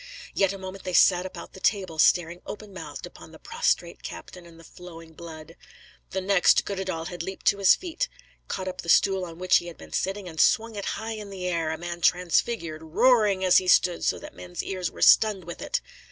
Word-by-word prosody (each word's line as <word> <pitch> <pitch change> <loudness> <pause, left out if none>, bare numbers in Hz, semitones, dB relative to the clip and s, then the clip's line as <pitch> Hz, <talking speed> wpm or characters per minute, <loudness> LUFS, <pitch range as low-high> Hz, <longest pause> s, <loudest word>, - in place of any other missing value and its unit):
Yet 195 -1 +2
a 200 - -6
moment 190 0 -8
they 185 - -4
sat 180 0 +5
about - - -11
the 190 - -11
table 185 -6 -1
staring 175 +1 +3
open 210 -1 -8
mouthed 185 - -8
upon - - -13
the - - -13
prostrate 470 +1 -1
captain 180 -2 -9
and 165 -1 -16
the - - -14
flowing 165 -1 -13
blood. 160 0 -11 0.5
The 190 - -3
next, 195 -1 +3
Goddedaal 185 -4 -4
had 175 -2 -6
leaped 190 +3 -7
to 200 - -1
his 195 - +6
feet, 375 +8 -4 0.4
caught 190 -1 -4
up 185 0 -5
the 170 - -8
stool 190 +2 +4
on 165 -2 -8
which 185 +1 +4
he 175 - -5
had 170 - -9
been - - -13
sitting, 195 0 -2
and 160 -2 -1
swung 225 0 +2
it 200 - -5
high 225 +1 -5
in 210 -2 -8
air, 180 -4 -2
a 160 - -3
man 175 0 -6
transfigured, 175 -2 +1
roaring 200 +3 +3
(as 180 - +6
he 185 - +1
stood) 180 -1 +3
so - - +1
that 300 0 -11
men's 180 -1 -7
ears 185 -3 -3
were - - -4
stunned 210 -4 +5
with 175 +1 -9
it. - - -2
185 Hz, 215 wpm, -26 LUFS, 170-200 Hz, 0.5 s, his